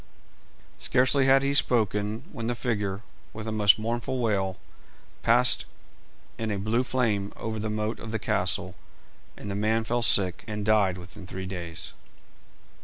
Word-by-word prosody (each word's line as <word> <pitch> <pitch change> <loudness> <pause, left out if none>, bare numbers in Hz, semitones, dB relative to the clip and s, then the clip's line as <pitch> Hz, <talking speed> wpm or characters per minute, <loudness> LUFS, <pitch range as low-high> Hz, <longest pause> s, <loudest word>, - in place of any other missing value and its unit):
Scarcely 130 +1 +3
had 135 0 +5
he 140 0 +1
spoken 110 -3 +1
when 115 0 -5
the 120 - -1
figure, 105 -5 -2 0.3
with 110 0 -6
a - - -2
most 105 -2 +5
mournful 120 +3 -2
wail, 100 -6 0 0.6
passed - - +4 0.7
in 110 -1 -2
a 105 - -1
blue 110 +5 +1
flame 110 -6 0
over 110 -1 -4
the 110 +1 -2
moat 105 +1 -2
of 110 - -7
the 110 - -1
castle, - - -1 0.6
and 100 - -6
the - - -3
man 110 +2 +1
fell 120 +2 -1
sick, 95 -6 +4
and 105 -2 -4
died 100 -4 +3
within 90 +2 -11
three 95 +1 -6
days. 90 -3 -6
110 Hz, 155 wpm, -27 LUFS, 100-115 Hz, 0.7 s, had